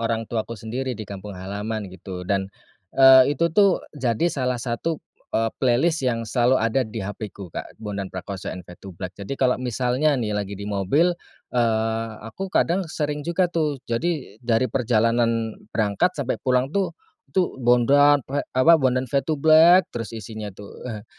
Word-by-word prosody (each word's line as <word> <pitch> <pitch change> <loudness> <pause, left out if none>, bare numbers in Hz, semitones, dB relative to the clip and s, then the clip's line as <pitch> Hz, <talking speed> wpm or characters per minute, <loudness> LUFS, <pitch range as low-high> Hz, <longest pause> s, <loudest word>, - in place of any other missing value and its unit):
orang 115 0 -1
tuaku 115 0 -4
sendiri 125 +3 -4
di 110 - -6
kampung 100 0 -8
halaman 100 +2 -5
gitu. 90 0 -8
Dan, 95 +1 -1 0.5
eee, 135 +1 +7
itu 170 +3 +1
tuh 200 0 +3
jadi 135 +4 0
salah 125 -2 -1
satu, 125 +7 -2 0.3
eee, 115 0 0
playlist 135 +6 +2
yang 120 -3 -1
selalu 120 +3 +2
ada 115 +1 0
di 110 -2 -5
HP-ku 100 -3 -7
Kak, - - -7
Bondan 100 -3 -5
Prakoso& 95 +1 -6 0.2
Fade2Black. 90 +1 -9
Jadi 100 +8 -6
kalau 125 -1 +1
misalnya 130 +4 +1
nih 110 -4 -2
lagi 100 -1 -3
di 100 - -7
mobil, 105 - +2 0.4
eee, 115 -1 0
aku 190 +12 -6
kadang 185 0 +2
sering 150 -1 -2
juga 170 +4 +1
tuh, 155 -4 0
jadi 130 - -3
dari 120 +1 +1
perjalanan 115 -2 +1 0.2
berangkat 110 - 0
sampai 140 -3 -2
pulang 130 +2 +1
tuh, 195 0 -1 0.3
itu 180 -8 -1
Bondan 135 +3 +4
Pra 140 +2 -2 0.2
apa, 160 +5 +6
Bondan 130 -1 +2
Fade2Black 155 +6 +4
terus 115 -1 -5
isinya 110 0 -7
tuh, 100 +1 -12
eee, 105 -3 -6
120 Hz, 155 wpm, -23 LUFS, 105-140 Hz, 0.5 s, eee